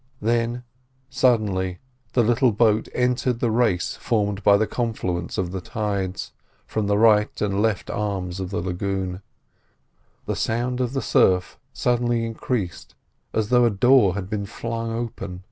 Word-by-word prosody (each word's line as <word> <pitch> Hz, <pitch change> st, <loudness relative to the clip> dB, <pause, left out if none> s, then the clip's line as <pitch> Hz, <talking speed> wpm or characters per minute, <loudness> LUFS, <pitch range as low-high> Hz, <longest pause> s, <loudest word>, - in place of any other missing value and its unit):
Then, 120 Hz, +2 st, 0 dB, 0.5 s
suddenly, 105 Hz, -8 st, +1 dB, 0.4 s
the 120 Hz, -, +4 dB
little 120 Hz, +2 st, +3 dB
boat 110 Hz, 0 st, +2 dB
entered 125 Hz, -1 st, +1 dB
the 120 Hz, -2 st, +1 dB
race 110 Hz, -7 st, +1 dB
formed 105 Hz, -3 st, -1 dB
by 100 Hz, 0 st, +6 dB
the 110 Hz, -, +2 dB
confluence 95 Hz, -8 st, -3 dB
of 90 Hz, -2 st, -1 dB
the 95 Hz, -1 st, -4 dB
tides, 100 Hz, -2 st, -3 dB, 0.3 s
from 110 Hz, -2 st, -2 dB
the 100 Hz, 0 st, +2 dB
right 105 Hz, -1 st, +4 dB
and 100 Hz, -1 st, 0 dB
left 110 Hz, -2 st, 0 dB
arms 95 Hz, -3 st, -3 dB
of 95 Hz, -1 st, -4 dB
the 95 Hz, -, -2 dB
lagoon; 95 Hz, 0 st, -3 dB, 1.0 s
the -, -, -2 dB
sound 125 Hz, +2 st, -1 dB
of 125 Hz, 0 st, -1 dB
the 135 Hz, -, -1 dB
surf 90 Hz, -1 st, +2 dB
suddenly 120 Hz, -1 st, 0 dB
increased 115 Hz, -5 st, -4 dB, 0.4 s
as 110 Hz, -1 st, -1 dB
though 125 Hz, -1 st, +5 dB
a -, -, +4 dB
door 110 Hz, -2 st, +4 dB
had 100 Hz, -2 st, -4 dB
been 100 Hz, -1 st, -3 dB
flung 115 Hz, +2 st, -4 dB
open. 110 Hz, -6 st, -5 dB
105 Hz, 150 wpm, -23 LUFS, 95-120 Hz, 1.0 s, by